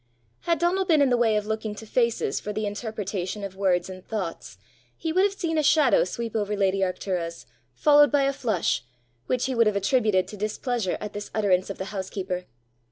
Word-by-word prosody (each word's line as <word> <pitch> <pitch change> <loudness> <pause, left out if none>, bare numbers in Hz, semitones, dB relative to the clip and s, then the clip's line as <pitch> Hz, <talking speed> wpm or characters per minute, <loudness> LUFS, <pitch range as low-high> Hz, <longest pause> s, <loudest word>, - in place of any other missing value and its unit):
Had 335 -1 0
Donal 350 +4 +1
been 325 -5 +4
in 280 -2 +4
the - - +5
way 230 -3 +3
of 210 -1 0
looking 220 0 -3
to 220 - -9
faces 235 - 0
for 210 - -5
the 215 +1 -2
interpretation 205 -2 -4
of 195 -1 -6
words 190 -2 +1
and 185 -1 -9
thoughts, 190 -7 -5 0.4
he 320 -1 -3
would 370 - +4
have 400 0 +2
seen 325 -4 -1
a - - +4
shadow 295 - +4
sweep 230 +4 -5
over 210 -1 0
lady 195 -1 +2
Arctura's, 180 -3 -2 0.3
followed 290 - +5
by 285 -1 +3
a 275 0 +1
flush, 215 - 0 0.4
which 250 -1 0
he 260 - -1
would 230 -2 +4
have 210 - +1
attributed 200 -2 +2
to 210 - -9
displeasure 215 0 -2
at 210 -1 -6
this 205 0 -6
utterance 190 -4 +2
of 195 - -5
the 190 - -4
housekeeper. 190 -2 -4
210 Hz, 205 wpm, -25 LUFS, 190-255 Hz, 0.4 s, the